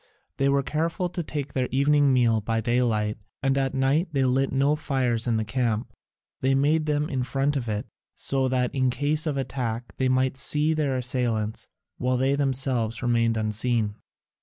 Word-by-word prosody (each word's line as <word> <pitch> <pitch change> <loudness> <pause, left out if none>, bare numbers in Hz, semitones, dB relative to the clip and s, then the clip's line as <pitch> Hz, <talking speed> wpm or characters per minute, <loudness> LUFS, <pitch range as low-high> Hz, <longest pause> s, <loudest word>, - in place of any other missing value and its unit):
They 135 0 +2
were 140 0 +2
careful 165 +5 -1
to 175 - -3
take 145 -3 -5
their 130 -2 0
evening 140 +1 +3
meal 120 -4 +3
by 115 +2 -1
daylight, 110 -2 0 0.2
and 135 0 +2
at 135 -1 0
night 135 +7 +2
they 135 -2 +2
lit 130 +1 +1
no 140 +3 +2
fires 130 -6 -1
in 115 -2 +2
the 110 - -1
camp: 115 -2 -1 0.5
they 135 +1 +2
made 155 +3 +2
them 150 0 +1
in 130 -4 -2
front 135 +4 0
of 120 -5 -2
it, 105 0 -2 0.3
so 135 -1 0
that 125 -1 0
in 130 -2 +2
case 145 +5 0
of 145 -2 -1
attack 125 -3 -3
they 130 -1 +1
might 130 +1 +1
see 150 +3 +3
their 145 -4 0
assailants, 120 -4 -1 0.3
while 125 0 +1
they 135 +2 +2
themselves 130 -5 0
remained 115 -1 +2
unseen. 110 0 0
130 Hz, 180 wpm, -25 LUFS, 120-140 Hz, 0.5 s, evening